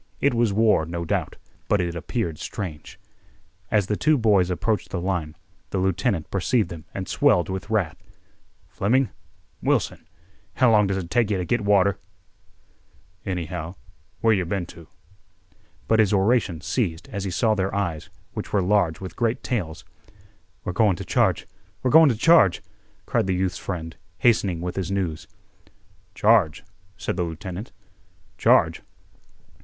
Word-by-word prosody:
It 140 - +2
was 115 -2 +2
war, 105 -6 +3
no 85 0 -4
doubt, - - -2 0.3
but 105 - +2
it 85 -2 -1
appeared 85 - -3
strange. 80 -7 -7 0.7
As 105 -3 +2
the 105 - -1
two 155 +7 +3
boys 105 -6 +3
approached 100 +2 -1
the 95 - -3
line, 85 -4 -2 0.3
the - - -3
lieutenant 95 -2 0
perceived 100 +1 +1
them 85 -3 -9
and 95 -2 -5
swelled 90 - +2
with 95 +2 -5
wrath. 105 -7 -1 0.7
"Fleming—Wilson—how 105 -2 -2
long 105 -2 +4
does 95 0 -1
it 90 -2 -5
take 115 +1 +2
yeh 100 - +1
to 90 - -2
git 120 +5 0
water, 100 -1 +3 1.3
anyhow—where 90 +5 -3
yeh 95 -3 +1
been 90 +1 -2
to." 85 -1 -13 1.0
But 110 - +3
his 105 -2 +4
oration 100 -4 +2
ceased 85 - -2
as 100 -2 -4
he 100 - -2
saw 110 +5 +2
their 95 -2 -1
eyes, 85 -7 -2 0.2
which - - -6
were 100 - +2
large 90 -4 +2
with 95 - -7
great 115 -1 -1
tales. 90 -11 -3 0.8
"We're 90 - -3
goin' 105 -2 +3
t' - - -6
charge—we're 100 +5 -1
goin' 160 0 +8
t' 120 - +1
charge!" 120 - +4 0.4
cried - - 0
the 95 - +1
youth's 95 0 -1
friend, 80 -4 -5 0.2
hastening 100 -8 +2
with 90 +1 -4
his 95 -2 -2
news. 90 -5 -2 0.9
"Charge?" 105 -8 +3 0.3
said - - -3
the 90 - +1
lieutenant. 90 +5 -6 0.7
"Charge? - - +4
95 Hz, 145 wpm, -24 LUFS, 85-110 Hz, 1.3 s, goin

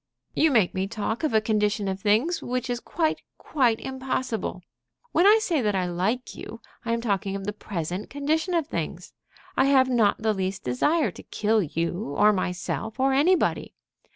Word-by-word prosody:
"You 320 - +3
make 220 -10 +3
me 190 0 -1
talk 220 +5 -3
of 310 - +1
a 220 - +4
condition 210 -1 0
of 190 0 -2
things 225 - +2
which 250 0 -2
is 240 - -2
quite, 315 +4 -1 0.2
quite 245 -6 +1
impossible. 255 -7 -3 0.5
When 355 - +4
I 425 +2 +8
say 340 -9 0
that 210 -3 0
I 185 -1 +1
like 190 +8 -2
you, 230 - -9 0.2
I 230 - -2
am 230 - -1
talking 200 -3 -1
of 195 -1 -5
the 210 - -2
present 185 -2 -5
condition 315 +5 -1
of 330 -3 +1
things. - - -5 0.4
I 265 - +4
have 265 -2 +4
not 225 -5 +3
the 220 -1 +2
least 190 -1 -3
desire 295 - +1
to - - -11
kill 220 +1 +1
you, 170 -1 -3
or 210 0 +5
myself, 195 +5 -3
or 270 +1 +3
anybody. 330 +7 +2
220 Hz, 180 wpm, -25 LUFS, 195-265 Hz, 0.5 s, I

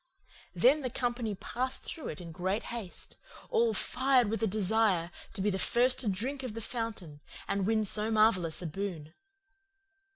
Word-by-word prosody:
"Then 255 - +5
the 255 - -2
company 240 -3 -2
passed 255 +6 -2
through 315 - -6
in 165 +2 -7
great 185 +6 -2
haste, 215 -7 -7 0.3
all 460 -1 +3
fired 255 -4 +3
with 225 - -2
a 225 - +2
desire 195 -3 +1 0.2
to - - -4
be 210 - +2
the 190 - -2
first 245 +6 +3
to 245 - +1
drink 250 +9 -2
of 250 -5 -5
the - - -4
fountain 210 -10 -5 0.3
and 200 -1 0
win 220 -1 +2
so 210 +1 +2
marvellous 200 -7 +3
a - - -4
boon. 165 -2 -5
215 Hz, 165 wpm, -31 LUFS, 185-245 Hz, 0.3 s, Then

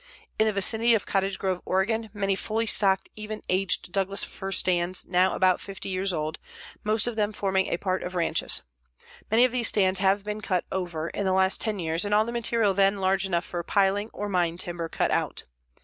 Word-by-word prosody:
In 220 - +4
the - - +2
vicinity 220 +4 +4
of 210 - -2
Cottage 195 0 -1
Grove, 185 -2 -2
Oregon, 220 +4 -1
many 195 -2 -1
fully 220 +3 -2
stocked 195 -3 +3
even 215 0 -7
aged 185 -1 0
Douglas 195 +1 0
fir 195 0 -6
stands 180 -1 +2
now 180 +1 +2
about 185 -1 +2
50 195 -1 -7
years 190 +1 0
old, 155 -2 -3 0.4
most 215 0 +2
of 240 -2 -2
them 210 -1 0
forming 190 -2 0
a - - -1
part 185 0 -2
of 180 +1 -6
ranches. 170 -2 0 0.7
Many 230 +3 +5
of 255 - -1
these 245 -2 +2
stands 190 -2 +2
have 195 +1 +2
been 210 +1 -5
cut 185 -4 -1
over 170 -3 -3
in 200 - -4
the 190 - +1
last 190 0 +2
10 215 -2 -1
years 165 -1 0
and 205 0 +1
all 215 +1 +3
the 235 - -4
material 230 -3 +2
then 195 +1 +3
large 190 0 +1
enough 175 -2 -1
for 175 - -4
piling 200 +3 +1
or 205 - -5
mine 175 -4 0
timber 175 -2 -3
cut - - -1
out. - - -1
195 Hz, 210 wpm, -26 LUFS, 185-210 Hz, 0.7 s, Many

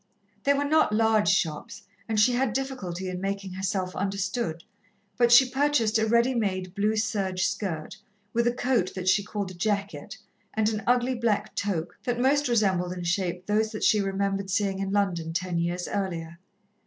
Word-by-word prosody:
They 280 0 +4
were 285 +1 0
not 310 -4 +3
large 220 -1 +3
shops, 195 +4 -1 0.3
and 220 -1 +1
she 245 +4 +5
had 245 -3 +1
difficulty 205 -9 -4
in 180 0 -4
making 195 -1 -3
herself 190 -1 -2
understood, 195 -3 -2 0.5
but 240 -1 +3
she 250 +2 +8
purchased 255 -5 +2
a 220 - +1
ready 235 +3 +3
made 185 -6 -2
blue 210 +2 +1
serge 195 -4 0
skirt, 165 -4 -3 0.4
with 235 +1 +2
a - - +4
coat 245 -6 0
that 185 -1 -5
she 185 +2 +4
called 200 -2 -4
a - - -9
jacket, 200 +2 -3 0.4
and 220 -1 +2
an 215 -1 -3
ugly 245 +1 +3
black 220 -4 -1
toque, 180 -5 -2
that 245 -1 -1
most 280 +3 +3
resembled 190 -6 +1
in 180 -1 -6
shape 180 0 -1
those 215 +2 +1
that 215 - -4
she 210 - +4
remembered 195 0 -1
seeing 195 0 0
in 195 0 -2
London 175 -5 0
ten 175 0 -1
years 175 +1 -2
earlier. 170 -4 -4
200 Hz, 180 wpm, -26 LUFS, 185-230 Hz, 0.5 s, she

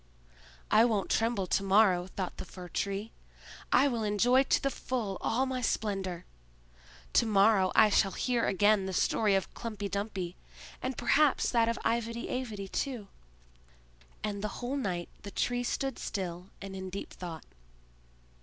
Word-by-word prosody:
"I 215 +1 +7
won't 220 -5 +1
tremble 225 -4 +1
to 185 - +1
morrow!" 195 -2 +4
thought 190 -1 -5
the - - -5
Fir 180 0 -10
tree. 200 +4 -3 0.6
"I 285 - +5
will 240 -4 -1
enjoy 220 +5 +4
to 270 - +2
the 275 - -1
full 225 -9 -3
all 255 +4 +1
my 260 -1 -2
splendor! 195 -6 -2 0.9
To - - +4
morrow 200 -2 +4
I 215 -1 +6
shall 195 -1 +3
hear 245 -2 0
again 205 0 +3
the 190 - -4
story 205 +2 +2
of 195 - -1
Klumpy 210 -4 -5
Dumpy, 195 -3 -3 0.5
and 255 -1 -3
perhaps 295 -2 +3
that 230 -2 +3
of 230 - -1
Ivedy 230 0 -1
Avedy 220 -6 -4
too." 235 -1 -3 1.1
And 205 -2 -2
the - - +1
whole 250 +3 -3
night 185 -10 -2
the 205 - -7
Tree 245 +4 -1
stood 270 +2 -2
still 180 -2 -4 0.2
and 195 -1 -7
in 190 0 -5
deep 195 +2 -6
thought. 170 -3 -7
210 Hz, 155 wpm, -30 LUFS, 190-235 Hz, 1.1 s, I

